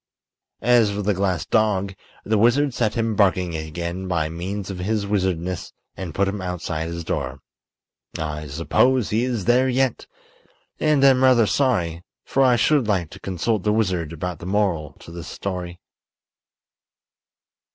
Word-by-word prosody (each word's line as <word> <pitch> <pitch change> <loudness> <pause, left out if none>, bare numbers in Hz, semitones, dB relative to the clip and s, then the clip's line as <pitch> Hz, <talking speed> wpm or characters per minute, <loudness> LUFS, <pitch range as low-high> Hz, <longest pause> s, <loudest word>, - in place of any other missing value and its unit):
As 120 -3 +5
for 100 0 -3
the 105 +1 +2
glass 90 -4 -1
dog, 100 -3 +1 0.3
the 110 0 +1
wizard 130 +5 +3
set 110 -3 0
him 115 -1 0
barking 95 -4 +2
again 85 +4 -4
by 80 -4 0
means 95 +4 -5
of 90 - -7
his 105 +2 -1
wizardness 95 -3 -2 0.2
and 90 -5 -6
put 100 0 +2
him 100 0 -3
outside 85 -3 -3
his 85 0 -5
door. 70 -4 -3 0.8
I 75 -1 -4
suppose 105 - +1
he 110 +3 +2
is 120 -7 -2
there 125 +2 +4
yet, 130 -1 0 0.7
and 150 -3 +3
am 135 -2 +6
rather 125 -3 +6
sorry, 95 - 0 0.2
for 135 - +1
I 130 -2 +5
should 140 0 +2
like 90 -7 0
to - - -11
consult 95 +3 -1
the 105 - +1
wizard 95 -7 0
about 85 +1 -5
the 85 - -8
moral 95 -7 0
to - - -12
this 85 0 -8
story. 90 -2 -5
95 Hz, 155 wpm, -22 LUFS, 85-115 Hz, 0.8 s, am